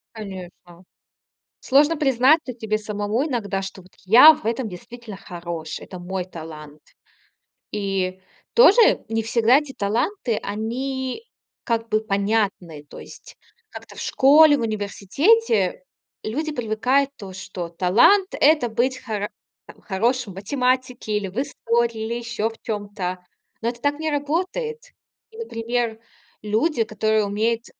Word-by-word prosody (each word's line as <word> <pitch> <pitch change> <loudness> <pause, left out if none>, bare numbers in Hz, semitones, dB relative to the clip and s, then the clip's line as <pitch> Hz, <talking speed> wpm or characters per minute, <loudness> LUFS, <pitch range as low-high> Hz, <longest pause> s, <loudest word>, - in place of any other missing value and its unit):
Конечно. 185 -4 -10 0.8
Сложно 295 +4 +3
признаться 270 +1 +3
тебе 220 -2 -2
самому 210 +4 -2
иногда, 205 -8 -2
что 195 0 -8
вот: 185 - -21
"Я 245 +11 +9
в 305 - -14
этом 230 +1 -1
действительно 215 +3 -10
хорош, 170 -4 -6
это 185 - -10
мой 180 +1 -4
талант". 155 -4 -10 0.9
И 195 -2 -2 0.3
тоже 470 -1 +6
не 225 0 -1
всегда 235 +3 +4
эти 295 -2 -6
таланты- 230 - -1
они 255 - -3 0.4
как 230 -2 -1
бы 215 -1 +1
понятны. 200 -7 -1
То - - -11
есть - - -13 0.3
как-то - - -11
в - - -7
школе, 290 +2 +6
в 245 - -3
университете 290 - +1 0.4
люди 300 +9 -2
привыкают, 250 +3 +1
то, 195 -6 -9
что 190 -2 -6
талант- 215 - +3
это 300 -4 +4
быть 255 +3 0
хоро 210 -3 -3 0.4
там - - -15
хорошим 230 +3 -1
в 185 - -16
математике 250 +1 -1
или 200 -2 -4
в 190 - -14
истории, 235 -4 -1
или 230 +1 -3
ещё 235 -2 -2
в 225 - -12
чём-то. 205 -4 -4 0.4
Но 230 - -1
это 240 0 -5
так 290 +1 0
не 315 -1 -1
работает. 360 - -2 0.5
И, 445 - -16
например, 235 - -3 0.4
люди, 225 +4 +1
которые 215 0 0
умеют 225 +3 -1
225 Hz, 135 wpm, -22 LUFS, 200-265 Hz, 0.9 s, Я